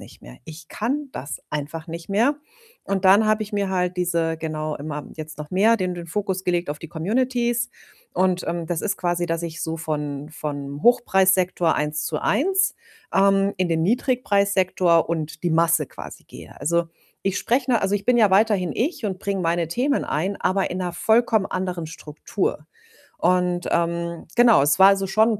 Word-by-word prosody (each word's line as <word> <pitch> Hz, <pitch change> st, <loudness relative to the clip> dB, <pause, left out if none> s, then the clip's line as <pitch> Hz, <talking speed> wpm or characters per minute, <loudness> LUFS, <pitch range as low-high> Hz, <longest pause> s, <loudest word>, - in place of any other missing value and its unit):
nicht -, -, -14 dB
mehr. -, -, -12 dB
Ich 160 Hz, +1 st, -11 dB
kann 275 Hz, +7 st, -2 dB
das 140 Hz, +1 st, -6 dB
einfach 150 Hz, +2 st, -5 dB
nicht 165 Hz, +1 st, -7 dB
mehr.“ 235 Hz, +9 st, +2 dB, 0.5 s
Und 195 Hz, -1 st, -2 dB
dann 200 Hz, +3 st, +6 dB
habe 215 Hz, 0 st, +2 dB
ich 215 Hz, -, -8 dB
mir 200 Hz, -2 st, -1 dB
halt 180 Hz, -1 st, -1 dB
diese 170 Hz, -2 st, 0 dB
genau 155 Hz, -1 st, -3 dB
immer 150 Hz, 0 st, -6 dB
jetzt 155 Hz, -1 st, -8 dB
noch 150 Hz, 0 st, -7 dB
mehr 215 Hz, +5 st, +4 dB
den 185 Hz, -1 st, -1 dB
den 175 Hz, -1 st, -7 dB
Fokus 190 Hz, +1 st, -3 dB
gelegt 175 Hz, -2 st, 0 dB
auf 150 Hz, -, -5 dB
die 165 Hz, -, -8 dB
Communities. 240 Hz, -, 0 dB, 0.4 s
Und, 185 Hz, -1 st, +1 dB
ähm, 170 Hz, -1 st, -3 dB
das 170 Hz, 0 st, -2 dB
ist 200 Hz, -1 st, -1 dB
quasi, 175 Hz, -1 st, -1 dB
dass 165 Hz, 0 st, -2 dB
ich 170 Hz, -1 st, -5 dB
so 160 Hz, 0 st, -3 dB
von 150 Hz, -2 st, -4 dB
von 145 Hz, -1 st, -6 dB
Hochpreissektor 190 Hz, -8 st, +3 dB
Eins-zu-eins, 195 Hz, -, 0 dB, 0.4 s
ähm, 195 Hz, 0 st, +3 dB
in 185 Hz, -1 st, +1 dB
den 165 Hz, -1 st, +1 dB
Niedrigpreissektor 200 Hz, -, +2 dB
und 160 Hz, -1 st, -4 dB
die 175 Hz, -, +2 dB
Masse 165 Hz, -1 st, +3 dB
quasi -, -, -11 dB
gehe. -, -, -13 dB
Also, 170 Hz, +2 st, +1 dB, 0.4 s
ich 195 Hz, 0 st, -1 dB
spreche 255 Hz, +2 st, 0 dB
'ne 235 Hz, -, +2 dB
also, 195 Hz, +1 st, +1 dB
ich 205 Hz, -1 st, -2 dB
bin 250 Hz, -, +4 dB
ja 215 Hz, -4 st, +5 dB
weiterhin 195 Hz, -4 st, +3 dB
ich 255 Hz, -1 st, -2 dB
und 190 Hz, -2 st, -3 dB
bringe 195 Hz, -2 st, -2 dB
meine 170 Hz, -1 st, 0 dB
Themen 265 Hz, -, 0 dB
ein, 190 Hz, +6 st, -2 dB
aber 190 Hz, +1 st, 0 dB
in 180 Hz, -, -3 dB
'ner 180 Hz, -1 st, -3 dB
vollkommen 220 Hz, +2 st, +2 dB
anderen 180 Hz, -3 st, -3 dB
Struktur. 155 Hz, +1 st, -4 dB, 0.5 s
Und, 180 Hz, 0 st, +1 dB
ähm, 170 Hz, 0 st, -1 dB
genau, 240 Hz, -, +6 dB
es 145 Hz, +5 st, +2 dB
war 190 Hz, -, +9 dB
also 195 Hz, -1 st, +1 dB
schon 215 Hz, +4 st, +3 dB
'n 210 Hz, -, -4 dB
180 Hz, 180 wpm, -23 LUFS, 165-205 Hz, 0.5 s, war